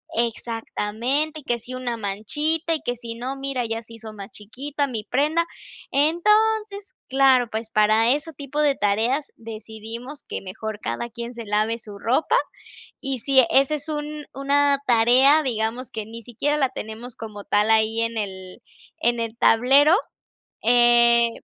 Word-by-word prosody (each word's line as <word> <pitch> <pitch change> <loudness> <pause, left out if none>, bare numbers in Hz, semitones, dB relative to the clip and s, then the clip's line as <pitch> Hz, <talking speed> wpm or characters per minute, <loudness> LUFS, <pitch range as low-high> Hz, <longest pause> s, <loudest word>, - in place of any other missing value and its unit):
exactamente, 235 +5 -2
que 240 -2 0
si 240 +2 -9
una 245 -2 -3
manchita 295 +11 -1
y 310 - -5
que 245 - -3
si 230 -1 -7
no, 255 +3 -4
mira, 270 -2 -3
ya 225 0 -3
se 230 0 -16
hizo 220 -1 -10
más 200 -1 -9
chiquita 275 +9 -4
mi 225 -5 -4
prenda. 300 +7 +1 0.5
Entonces, 405 +6 +1 0.2
claro, 260 -3 +4
pues 220 0 -5
para 215 +2 +4
ese 295 +3 -1
tipo 285 +1 -3
de 285 -2 +3
tareas 225 +8 0
decidimos 225 +4 -8
que - - -6
mejor 210 +3 -6
cada 120 - -4
quien 235 +1 -7
se 235 -1 -8
lave 215 +3 0
su 210 -2 -9
ropa 250 +9 +1 0.7
y, 270 -2 -3
sí, 265 +1 +4
ese 275 +3 +3
es 295 +2 -6
un 300 -1 -5
una 280 +1 +3
tarea, 250 +6 +5
digamos, 235 -1 -2
que 220 - -5
ni 230 +1 -9
siquiera 280 +7 -1
la 270 -2 +2
tenemos 230 0 -8
como 210 -3 -9
tal 210 +1 +1
ahí 220 +1 +3
en 230 0 -2
el 190 -3 -6 0.4
en 240 0 +1
el 230 -1 -3
tablero, 275 +10 +5 0.7
eh, 235 0 +5
240 Hz, 155 wpm, -23 LUFS, 225-280 Hz, 0.7 s, tarea